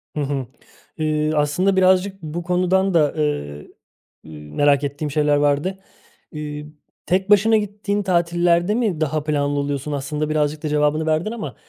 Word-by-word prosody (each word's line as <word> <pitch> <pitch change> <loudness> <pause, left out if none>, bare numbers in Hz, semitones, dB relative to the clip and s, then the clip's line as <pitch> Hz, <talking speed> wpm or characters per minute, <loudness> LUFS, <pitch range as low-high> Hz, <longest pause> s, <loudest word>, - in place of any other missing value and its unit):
Hı 150 - -1
hı. 140 -3 -2 0.5
Eee, 155 -1 0
aslında 150 +7 +1
birazcık 190 +1 +2
bu 160 +2 -5
konudan 185 +2 +1
da, 150 -4 +3
eee, 75 - -2 0.6
ııı, 75 -1 -11
merak 145 -1 +3
ettiğim 145 +1 -3
şeyler 150 0 +2
vardı. 145 +6 0 0.5
Eee, 150 -1 -6 0.4
tek 190 +3 0
başına 215 +2 +5
gittiğin 205 0 -2
tatillerde 175 +1 +2
mi 210 -10 -1
daha 155 0 0
planlı 145 -1 0
oluyorsun? 140 +1 -3
Aslında 150 +2 -3
birazcık 150 0 -1
da 155 - -2
cevabını 150 +1 +1
verdin 160 +6 0
ama, 180 - -6
155 Hz, 150 wpm, -21 LUFS, 145-185 Hz, 0.6 s, başına